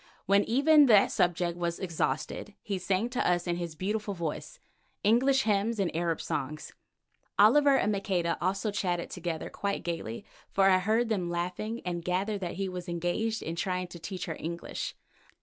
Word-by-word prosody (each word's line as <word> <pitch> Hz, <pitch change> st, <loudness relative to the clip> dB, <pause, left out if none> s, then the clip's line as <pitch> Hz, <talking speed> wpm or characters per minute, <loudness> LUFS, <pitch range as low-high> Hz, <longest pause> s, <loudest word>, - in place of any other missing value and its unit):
When 200 Hz, +1 st, +4 dB
even 290 Hz, +4 st, +5 dB
that 210 Hz, -4 st, +6 dB
subject 175 Hz, -1 st, +1 dB
was 170 Hz, -1 st, -2 dB
exhausted, 170 Hz, +2 st, -2 dB
he 200 Hz, -2 st, -2 dB
sang 190 Hz, +4 st, 0 dB
to 250 Hz, +1 st, 0 dB
us 175 Hz, 0 st, +1 dB
in 175 Hz, -1 st, -1 dB
his 170 Hz, -2 st, -5 dB
beautiful 205 Hz, +4 st, -2 dB
voice—English 240 Hz, -, -1 dB
hymns 215 Hz, +2 st, +1 dB
and 185 Hz, -5 st, 0 dB
Arab 165 Hz, -1 st, 0 dB
songs. 150 Hz, +3 st, -4 dB, 0.6 s
Oliver 275 Hz, +7 st, +6 dB
and 210 Hz, -, +1 dB
Maqueda 185 Hz, -4 st, 0 dB
also 195 Hz, +4 st, 0 dB
chatted 180 Hz, -4 st, -2 dB
together 170 Hz, -3 st, -4 dB
quite 200 Hz, 0 st, -2 dB
gaily, 165 Hz, -10 st, -4 dB, 0.2 s
for 195 Hz, 0 st, +4 dB
I 185 Hz, -, +5 dB
heard 220 Hz, +5 st, +1 dB
them 185 Hz, -6 st, 0 dB
laughing, 180 Hz, +7 st, -3 dB
and 175 Hz, -1 st, -3 dB
gathered 195 Hz, +4 st, -1 dB
that 175 Hz, -2 st, -3 dB
he 195 Hz, +1 st, -2 dB
was 180 Hz, -1 st, -6 dB
engaged 175 Hz, +7 st, -1 dB
in 165 Hz, -, -4 dB
trying 180 Hz, +1 st, -2 dB
to 175 Hz, -, -10 dB
teach 185 Hz, +3 st, -5 dB
her 165 Hz, -4 st, -4 dB
English. 170 Hz, +1 st, -5 dB
185 Hz, 165 wpm, -29 LUFS, 170-210 Hz, 0.6 s, that